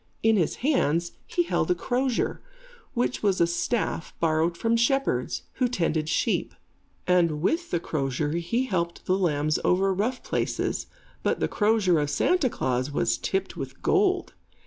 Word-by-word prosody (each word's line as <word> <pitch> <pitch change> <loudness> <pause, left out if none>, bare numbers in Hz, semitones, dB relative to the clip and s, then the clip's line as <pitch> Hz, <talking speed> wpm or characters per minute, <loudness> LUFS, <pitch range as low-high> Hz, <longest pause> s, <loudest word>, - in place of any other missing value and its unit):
In 225 0 +5
his 175 -7 +1
hands, 170 - +2 0.2
he 410 -6 +1
held - - 0
a 360 - +3
crozier, 255 -4 -1 0.5
which 245 +1 0
was 200 -3 +2
a 170 - +5
staff 170 +2 -2
borrowed 165 +1 +1
from 230 +4 +1
shepherds, 270 +4 +1
who 255 - +2
tended 165 -9 -1
sheep; - - 0 0.5
and 170 -4 +3
with 335 - 0
the 175 - 0
crozier 145 -2 -2
he 170 +10 0
helped 170 -6 -2
the 185 - +2
lambs 155 -5 +1
over 190 +2 +3
rough 225 +7 -1
places; - - -2 0.3
but - - 0
the - - +1
crozier 205 -6 +2
of 145 -1 0
Santa 315 - +2
Klaas 130 - -1
was 145 - +1
tipped 190 0 -2
with - - -7
gold. 385 -2 +2
185 Hz, 155 wpm, -26 LUFS, 165-245 Hz, 0.5 s, In